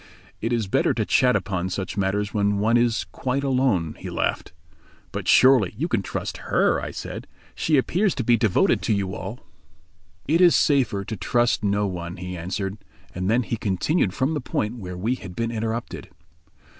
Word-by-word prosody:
"It 115 - -1
is 115 -3 +1
better 95 - +1
to - - 0
chat 125 -1 +3
upon 95 -3 -1
such 95 0 -4
matters 100 +1 -1
when 100 -1 +1
one 110 +3 +2
is 120 -4 +2
quite 130 +6 -2
alone," 125 - +1
he - - -6
laughed. - - -2 0.6
"But - - -5
surely 125 -7 +5
you 160 +7 -1
can 115 - 0
trust - - -4
her," - - +2
I - - -4
said, - - -7 0.3
"She 155 -2 +1
appears 180 +9 +1
to 130 - -2
be 120 +1 +4
devoted 110 -5 +2
to - - +1
you 95 -2 -1
all." 100 +7 -6 0.9
"It 165 +5 +3
is 175 -2 +7
safer 125 -9 +2
to 110 - -4
trust 120 +5 +1
no 100 0 +1
one," 90 -2 -5
he 90 +1 -6
answered. 95 +4 -4 0.3
And 90 +2 -2
then 120 +3 +3
he 115 - -3
continued 105 - 0
from 135 +5 0
the 150 - -2
point 115 -1 -2
where 90 -3 -7
we 110 +7 0
had 95 -8 -8
been 115 +2 -2
interrupted. 115 +1 -4
110 Hz, 185 wpm, -24 LUFS, 95-125 Hz, 0.9 s, is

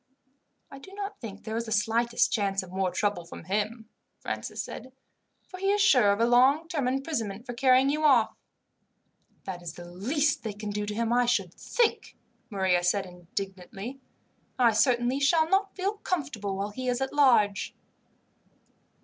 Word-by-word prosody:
"I 275 - -10
do 385 +8 -13
not 405 -6 -6
think 205 -4 -8
there 220 0 -4
is 230 0 -2
the 220 - -7
slightest 225 +3 +1
chance 195 -3 0
of 180 - -12
more 190 0 0
trouble 205 -1 -1
from 165 - -11
him," 215 +3 -2 0.3
Francis - - -4
said. 260 - -9 0.7
"He 390 +1 0
is 410 - +1
sure 250 - +5
of 200 - 0
a 230 - +4
long 260 +7 +4
term 300 -7 -1
of 255 - +1
imprisonment 235 -7 -3
for 245 - -5
carrying 260 +2 +4
you 305 +1 -1
off." 260 -7 +4 1.1
"That 180 -2 -6
is 170 -2 -7
the 175 - -9
least 260 - 0
they 220 -2 -4
can 205 0 -6
do 205 0 -3
to 210 - -4
him, 230 +1 0
I 245 0 +3
should 195 -8 0
think," 475 -2 -1 0.3
Maria 190 -4 +1
said 195 +2 +1
indignantly. 195 +6 -7 0.6
"I 240 -3 +5
certainly 245 +3 +2
shall 315 +3 +3
not 390 +3 +1
feel 395 +3 -2
comfortable 260 - -3
while 200 +2 -3
he 255 +4 -5
is 250 0 0
at 265 0 -2
large." 235 -9 +3
235 Hz, 175 wpm, -28 LUFS, 200-275 Hz, 1.1 s, sure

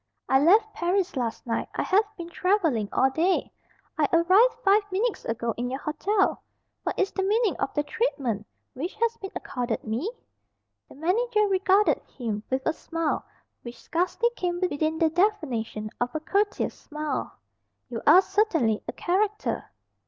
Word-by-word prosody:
"I 265 - +4
left 420 +9 +4
Paris 360 +1 0
last 240 -4 -3
night. 230 -1 -2
I - - 0
have 410 +3 +3
been 340 -1 -7
travelling 330 - +1
all 265 - +3
day. 340 +7 +1 0.5
I 295 - +4
arrived 375 +9 +5
five 400 +2 +6
minutes 425 +4 -1
ago 230 0 -2
in 245 +1 -2
your 265 +2 -3
hotel. 385 +8 0 0.4
What - - -3
is 390 - +1
the 385 - -2
meaning 425 +3 +2
of - - -1
the 295 - +1
treatment 280 - -2 0.3
which 320 +9 -5
has 460 +1 0
been 390 - -7
accorded 245 -3 -3
me?" 240 - -2 0.8
The - - -14
manager 425 - +1
regarded 390 +1 +3 0.2
him 220 -5 -3
with 260 0 -1
a 320 - +2
smile 330 -2 -2 0.4
which 240 0 -9
scarcely 370 +8 0
came 350 -1 -2
within 315 -3 0
the 320 -1 +2
definition 260 - -1
of 245 +3 -1
a - - 0
"courteous 405 +6 0
smile." 300 0 -4 0.5
"You 235 -3 -5
are 355 +6 +8
certainly 325 - +1
a - - -3
character." 410 +4 -1
340 Hz, 160 wpm, -26 LUFS, 265-400 Hz, 0.8 s, are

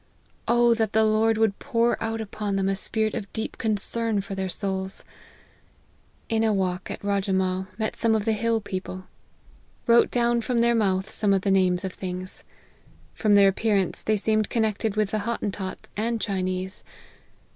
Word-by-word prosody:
Oh! 240 0 +4
that 220 -2 -1
the 220 +1 +4
Lord 220 +1 +3
would 220 -3 +1
pour 235 0 +1
out 225 0 -2
upon 210 -1 -3
them 195 0 +1
a 195 - +1
spirit 215 +2 0
of 200 - -5
deep 220 - -4
concern 220 0 0
for 195 - -7
their 190 -1 -2
souls! 190 0 -2 1.2
In 225 0 +1
a 220 - +3
walk, 185 -2 -1
at - - -6
Rajemahl, 190 -2 0
met 220 -1 -2
some 225 -1 +2
of 215 -1 -1
the 225 - +2
hill 225 +1 0
people. 185 -1 -6 0.8
Wrote 235 0 +5
down 235 -1 +2
from 235 +1 0
their 235 0 +4
mouth 195 -4 +1
some 205 -2 +2
of 190 - -1
the 195 - +1
names 185 -1 +2
of 185 - -4
things. 185 0 -6 0.7
From 210 -2 +2
their 200 -1 +7
appearance, 195 -2 0
they 215 0 +1
seemed 215 0 +1
connected 220 -2 0
with 215 -2 +1
the 215 - 0
Hottentots 200 -3 -4
and 230 +2 -1
Chinese. 185 -1 -3
210 Hz, 170 wpm, -25 LUFS, 190-225 Hz, 1.2 s, their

